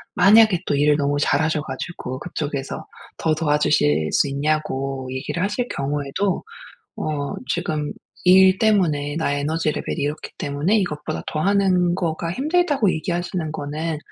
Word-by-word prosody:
만약에 205 0 +6
또 145 - +1
일을 145 +1 +3
너무 145 -1 0
잘하셔 155 +1 +1
가지고 130 -2 -6
그쪽에서 145 -4 -4 0.3
더 160 - +1
도와주실 145 - +2
수 - - +3
있냐고 135 -2 -2
얘기를 135 +6 -3
하실 210 +5 -1
경우에도 145 +7 -1 0.5
"어. 145 -2 -3 0.2
지금 155 -4 -2 0.3
일 185 +1 +7
때문에 155 -10 +2
나의 145 -3 0
에너지 155 +1 0
레벨이 - - -4
이렇기 145 +2 -3
때문에 145 +8 0
이것보다 150 - -3
더 155 - -2
하는 185 -2 +2
거가 165 -2 -2
힘들다."고 290 - +2
얘기하시는 170 0 -3
거는 155 +1 -3
155 Hz, 325 characters per minute, -22 LUFS, 145-180 Hz, 0.5 s, 일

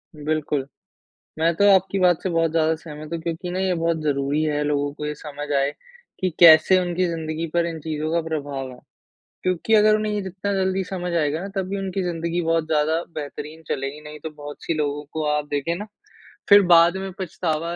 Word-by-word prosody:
बिल्कुल। 150 -2 -2 0.7
मैं 165 +1 +2
तो 205 0 +5
आपकी 190 +1 +1
बात 180 -3 +3
से - - -1
बहुत 165 -1 +1
ज़्यादा 160 0 +2
सहमत 155 0 -10
हूँ 165 - -2
क्योंकि 170 +1 -4
ना 180 - -3
ये 190 -1 +1
बहुत 165 0 0
ज़रूरी 145 0 0
है 150 -1 0
लोगों 145 -1 0
को 150 0 -5
ये 150 - -3
समझ 145 -1 -8
आए 140 +1 +2 0.5
कि 185 -2 +1
कैसे 170 +2 +8
उनकी 180 0 0
ज़िंदगी 160 -1 -3
पर 170 -1 +2
इन 165 -1 -4
चीज़ों 155 0 -3
का 170 - +2
प्रभाव 140 -4 -4
है। 125 - -13 0.7
क्योंकि 185 +4 0
अगर 215 0 +6
उन्हें 215 0 -1
ये 205 - -1
जितना 190 +1 -4
जल्दी 190 0 0
समझ 180 -1 -4
आएगा 155 -2 +1
ना 195 - -5
तभी 195 +1 -2
उनकी 195 0 -3
ज़िंदगी 170 0 -2
बहुत 165 -1 +1
ज़्यादा 160 +2 +1
बेहतरीन 150 +1 -7
चलेगी 135 +2 -3
नहीं 150 0 -9
तो 160 - -4
बहुत 145 -1 -10
सी 165 - -1
लोगों 150 -1 -2
को 155 -1 -2
आप 150 0 -1
देखे 145 +4 -1
ना 210 +4 -6 0.6
फिर 200 0 +9
बाद 170 +2 +6
में 190 0 -5
पछतावा 170 -2 -2
165 Hz, 205 wpm, -23 LUFS, 150-180 Hz, 0.7 s, फिर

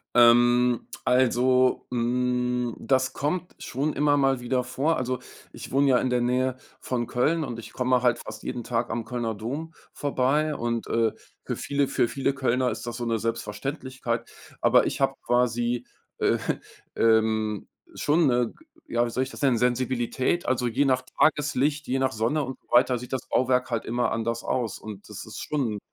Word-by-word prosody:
Ähm, 120 0 +5 0.2
also, 125 0 +3
hm, 125 0 0
das 130 -1 +1
kommt 175 +5 -2
schon 145 +5 -2
immer 145 0 +3
mal 135 -2 +2
wieder 125 +1 0
vor. 135 +6 0
Also, 130 -1 -2 0.3
ich - - -9
wohne 140 +1 +4
ja 130 -2 +5
in 130 - 0
der 125 0 +2
Nähe 125 +1 +1 0.2
von 120 -2 -2
Köln 155 +8 +1
und 120 -4 -5
ich 115 - -9
komme 125 -1 +1
halt 120 -1 +3
fast 110 - -9
jeden 120 - -4
Tag 115 +1 -1
am 115 0 -2
Kölner 120 -3 -2
Dom 140 +10 -5 0.2
vorbei. 145 +2 +1
Und, 120 -3 -2
äh, 115 -1 +1 0.3
für - - -3
viele 140 -1 0
für 120 - +1
viele 135 +3 -1
Kölner 130 -1 +1
ist - - -6
das 120 0 -5
so 120 - -3
'ne 115 -1 +1
Selbstverständlichkeit. 115 +2 -3 0.3
Aber - - +5
ich - - -3
habe - - +2
quasi, 120 0 +1 0.3
äh, - - +2 0.6
ähm, 110 -2 +2 0.3
schon 155 +2 +2
'ne 120 -2 +2
g 330 - -23 0.2
ja, 120 0 +1
wie - - -4
soll 125 +3 -1
ich 130 - -3
das - - -10
nennen, 135 -4 +3
Sensibilität, 125 +5 0
also 125 -1 +1
je 125 +4 +1
nach 130 -2 +3 0.2
Tageslicht, 150 -1 +2
je 130 - +1
nach 130 0 +1
Sonne 120 +7 0
und 130 0 -6
so - - -39
weiter 125 +1 +5
sieht 125 +2 -10
das 130 0 -4
Bauwerk 130 0 +1
halt 115 -2 -2
immer 120 +2 0
anders 115 +1 -2
aus. 115 -6 -1
Und, 105 -2 -9
das 105 -2 -8
ist 110 - -9
schon 125 -8 -1
125 Hz, 185 wpm, -26 LUFS, 120-130 Hz, 0.6 s, Ähm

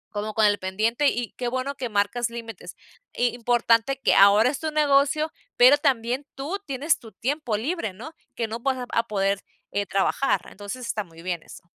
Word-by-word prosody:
como 210 +1 -3
con 220 - +4
el 205 0 +3
pendiente, 220 +9 0
y 240 -4 -1
qué 245 - -2
bueno 260 +3 -2
que 255 -3 -5
marcas 210 +3 0
límites 230 -4 -8 0.4
y, 245 - +2
importante 240 +2 +2
que - - +3
ahora 205 +5 +6
es 280 - -5
tu 315 - -2
negocio, 300 +1 +2 0.3
pero 255 +4 +8
también 260 -2 0
tú 300 +9 -4
tienes 280 +3 0
tu 225 -3 -13
tiempo 260 -3 -2
libre, 260 - -3
¿no? 250 - -10 0.2
Que 230 - -2
no 225 +1 -5
vas 265 +2 0
a 250 - -4
vas 230 - -1
a 230 - -1
poder, 195 -2 0 0.3
eh, 205 -1 -1
trabajar, 195 0 +1
entonces 205 +5 -7
está 215 -2 -2
muy 165 -2 -15
bien 175 -2 -3
eso. - - -13
235 Hz, 200 wpm, -25 LUFS, 210-275 Hz, 0.4 s, pero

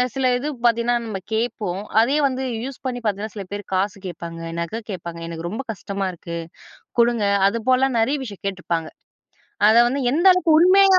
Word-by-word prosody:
சில 265 -1 0
இது 280 +4 -3 0.2
பார்த்தீங்கன்னா 235 +1 +3
நம்ம 205 -4 -4
கேட்போம். 220 -5 -1 0.2
அதே 270 +6 +2
வந்து 260 0 -3 0.2
யூஸ் 270 0 -6
பண்ணி 250 -1 -2
பார்த்தீங்கன்னா 210 0 -2
சில 200 - -4
பேரு 205 0 -4
காசு 195 +1 0
கேட்பாங்க, 170 -1 -6 0.2
நகை 170 +7 -3
கேட்பாங்க, 170 -2 -6
எனக்கு 165 0 -5
ரொம்ப 220 +8 -4
கஷ்டமா 200 -2 -4
இருக்கு 170 0 -7 0.6
குடுங்க, 235 -2 +3 0.2
அதுபோல 255 +5 +2
நெறைய 260 +6 +2
விஷயம் 205 -6 -9
கேட்டுருப்பாங்க. 175 -4 -2 0.8
அதை 220 +2 +6
வந்து 275 +3 -1
எந்த 330 +8 +2
அளவுக்கு 365 -2 +1
உண்மையா 380 +1 +7
220 Hz, 165 wpm, -22 LUFS, 190-260 Hz, 0.8 s, உண்மையா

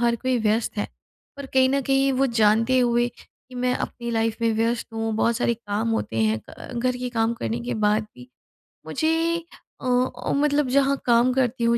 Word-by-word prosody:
हर 235 0 +2
कोई 255 +2 0
व्यस्त 220 +1 0
है, - - 0 0.5
पर 280 -1 -7
कहीं 260 0 +5
न 275 +1 +1
कहीं 270 +1 +2
वो 275 - +4
जानते 225 +5 +4
हुए 240 -1 +2
कि 255 - -19
मैं 250 0 0
अपनी 235 -1 -4
लाइफ 225 -1 0
में 230 - +3
व्यस्त 230 +2 0
हूँ, 225 0 -2
बहुत 230 +1 +2
सारे 235 - +1
काम 215 0 -3
होते 115 - -5
हैं 110 0 -1
क - - -11
घर 250 +1 0
के 250 0 -4
काम 225 +1 +2
करने 235 +1 -2
के - - -2
बाद 210 +1 +3
भी 125 0 -13 0.6
मुझे 315 - 0 0.7
अ - - -8
अ, 250 0 0
मतलब 290 -1 +2
जहाँ 275 0 +3
काम 240 +1 +4
करती 250 -2 0
हूँ, 235 0 +3
240 Hz, 200 wpm, -24 LUFS, 225-260 Hz, 0.7 s, कहीं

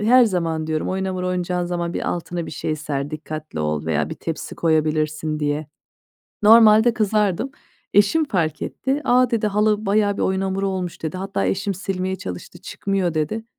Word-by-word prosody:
her 245 +4 +6
zaman 165 -6 -1
diyorum, 155 -1 -1
"Oyun 190 +1 -1
hamuru 185 -1 -2
oynayacağın 180 0 -1
zaman 175 -1 -2
bir - - -2
altına 175 0 -4
bir - - -7
şey 155 +1 -3
ser, 145 -1 -3
dikkatli 155 - -6
ol 75 0 -1
veya 80 -2 0
bir - - -3
tepsi - - -5
koyabilirsin." 155 -1 0
diye. 150 +1 -1 0.8
Normalde 220 +1 +7
kızardım. 210 +1 +1 0.4
Eşim 210 +11 +4
fark 170 - -1
etti. 270 +2 -2
"A," 250 -1 +4
dedi, 225 -2 +1
"halı 210 0 +1
bayağı 205 0 +2
bir - - -2
oyun 190 0 +1
hamuru 195 0 -1
olmuş." 185 -2 -4
dedi. 160 +2 -3
Hatta 195 +1 -2
eşim 195 0 -1
silmeye 190 0 -3
çalıştı, 95 - -8
"Çıkmıyor." 190 -3 -2
dedi. 155 +9 -1
185 Hz, 170 wpm, -22 LUFS, 155-205 Hz, 0.8 s, Normalde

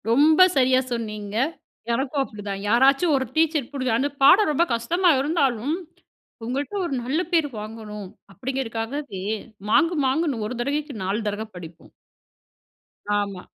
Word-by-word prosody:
ரொம்ப 310 +9 +6
சரியா 255 0 +4
சொன்னீங்க. 215 -3 -4 0.6
எனக்கும் 270 +3 -1
அப்படிதான். 205 -5 -6
யாராச்சும் 275 +8 +4
ஒரு 265 - -1
டீச்சர் 315 -5 +1
பிடிக்கும். 255 -5 0
அந்த 275 +4 0
பாடம் 360 +7 +7
ரொம்ப 300 +3 +3
கஷ்டமா 345 +11 +2
இருந்தாலும், 275 -2 0 0.7
இவுங்கள்ட்ட 265 - -3
ஒரு 335 - -3
நல்ல 270 +7 0
பேர் 325 -3 +3
வாங்கணும். 210 -2 -8 0.3
அப்படிங்கிறக்காகவே 255 -2 -4 0.5
மாங்கு 335 +4 +3
மாங்குன்னு 270 -4 0
ஒரு 250 - -5
தடவைக்கு 285 +1 -2
நாலு 195 +4 -1
தடவ 205 +2 -4
படிப்போம். 170 -1 -11 1.3
ஆமா. 200 -3 -4
260 Hz, 125 wpm, -24 LUFS, 220-295 Hz, 1.3 s, பாடம்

